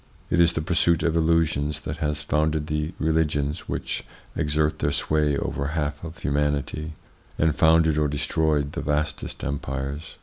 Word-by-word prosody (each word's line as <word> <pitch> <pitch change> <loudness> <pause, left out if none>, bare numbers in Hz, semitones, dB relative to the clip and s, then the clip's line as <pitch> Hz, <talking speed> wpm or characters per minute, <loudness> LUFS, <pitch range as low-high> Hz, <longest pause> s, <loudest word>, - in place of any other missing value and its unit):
It 85 - +3
is 85 -1 +5
the 80 - -2
pursuit 85 0 +2
of 85 -1 +1
illusions 80 -2 +1
that 80 +1 -5
has 75 -1 -1
founded 75 0 +1
the 75 +1 -2
religions 80 -1 0
which - - -3 0.3
exert 75 -1 +1
their - - +1
sway 75 -2 +1
over 70 - -2
a 70 - -2
half 75 -1 -2
of 85 0 -7
humanity, 75 +2 -1 0.4
and 80 -1 +2
founded 80 -1 +4
or 75 - +2
destroyed 75 0 0
the - - -4
vastest 75 +1 -2
empires. 70 +2 -4
75 Hz, 160 wpm, -25 LUFS, 75-80 Hz, 0.4 s, is